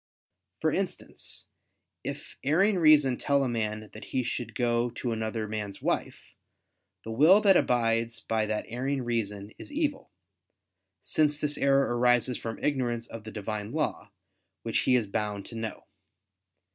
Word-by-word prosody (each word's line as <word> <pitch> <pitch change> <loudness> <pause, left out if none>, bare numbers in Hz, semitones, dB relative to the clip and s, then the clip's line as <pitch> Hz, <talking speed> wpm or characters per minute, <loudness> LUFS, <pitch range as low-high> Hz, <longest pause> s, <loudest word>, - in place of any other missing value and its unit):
For - - +2
instance, - - -4 0.6
if - - -6
erring 185 +8 +3
reason 150 -6 +6
tell 140 -1 +2
a - - 0
man 110 -2 -3
that 110 - -9
he 130 - -1
should 120 -2 -4
go 120 -1 +1
to 120 - -2
another 110 -1 -2
man's 105 -2 -4
wife, - - -3 0.7
the 115 - -6
will 155 - +6
that 200 -3 +6
abides 115 -4 +2
by 110 -1 0
that 105 0 -2
erring 130 +3 -2
reason 105 -4 -2
is - - -10
evil; 290 -2 -1 0.9
since 150 -1 +2
this 150 -1 0
error 135 -3 +3
arises 125 0 +3
from 115 -1 -5
ignorance 120 -5 0
of 115 -1 -9
the 110 - -7
Divine 105 0 -4
Law, - - -2 0.5
which - - 0
he 125 - +3
is 120 -3 +2
bound 105 0 -3
to 115 - -10
know. 110 -1 -5
120 Hz, 150 wpm, -28 LUFS, 110-140 Hz, 0.9 s, reason